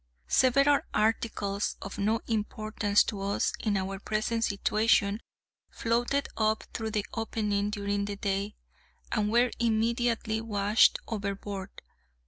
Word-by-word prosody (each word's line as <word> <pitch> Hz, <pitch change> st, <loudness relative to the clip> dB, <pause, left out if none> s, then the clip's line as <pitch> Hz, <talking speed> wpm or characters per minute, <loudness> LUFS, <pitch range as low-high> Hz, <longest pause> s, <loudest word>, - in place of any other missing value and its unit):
Several 275 Hz, +3 st, +4 dB, 0.2 s
articles, 210 Hz, -2 st, 0 dB
of 200 Hz, -, -7 dB
no 215 Hz, +3 st, +1 dB
importance 215 Hz, -1 st, +1 dB
to 205 Hz, -3 st, -4 dB
us 200 Hz, +1 st, 0 dB
in 210 Hz, -3 st, 0 dB
our 195 Hz, 0 st, -3 dB
present 215 Hz, +3 st, -1 dB
situation, 210 Hz, 0 st, +2 dB, 0.5 s
floated 240 Hz, +4 st, 0 dB
up 215 Hz, 0 st, +1 dB
through 220 Hz, -1 st, -3 dB
the 210 Hz, -2 st, -1 dB
opening 210 Hz, -2 st, -1 dB
during 200 Hz, -1 st, -1 dB
the 205 Hz, 0 st, -4 dB
day, 200 Hz, +1 st, -2 dB, 0.6 s
and 210 Hz, -1 st, +1 dB
were 240 Hz, +1 st, +3 dB
immediately 230 Hz, -1 st, +1 dB
washed 210 Hz, -1 st, +3 dB
overboard. 200 Hz, -2 st, -5 dB
215 Hz, 115 wpm, -29 LUFS, 200-230 Hz, 0.6 s, Several